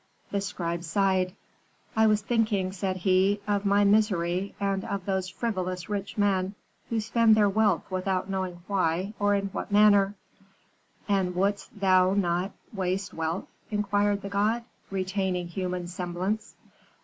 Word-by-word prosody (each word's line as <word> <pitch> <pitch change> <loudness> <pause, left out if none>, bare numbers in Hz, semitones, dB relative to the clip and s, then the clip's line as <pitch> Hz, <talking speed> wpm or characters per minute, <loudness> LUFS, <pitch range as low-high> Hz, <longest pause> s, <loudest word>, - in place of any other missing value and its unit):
"The 200 - 0
scribe 170 -3 -3
sighed. 185 +1 +1 0.6
"'I 220 0 +5
was 215 0 +3
thinking,' 215 -5 +1
said 190 0 -2
he, 190 +2 +3
'of 205 0 0
my 200 +1 +4
misery, 195 -3 +2
and 195 -1 0
of 200 -2 -4
those 190 -2 -1
frivolous 185 -4 -3
rich 200 0 -4
men 195 -1 +1 0.3
who 230 - 0
spend 225 0 +4
their 210 -1 +4
wealth 205 -3 +2
without 185 0 -1
knowing 185 -3 -3
why 190 0 0
or 205 0 +3
in 200 0 -1
what 195 - -5
manner.' 205 -1 +5 0.9
"'And 190 -3 +1
wouldst 200 +2 -1
thou 185 -1 +4
not 180 0 0 0.2
waste 190 -1 -2
wealth?' 165 +2 -2 0.2
inquired 205 -1 +1
the 200 - -4
god, 210 +4 +1 0.3
retaining 190 -2 -1
human 180 0 -3
semblance. 180 +4 -3
195 Hz, 140 wpm, -27 LUFS, 185-205 Hz, 0.9 s, I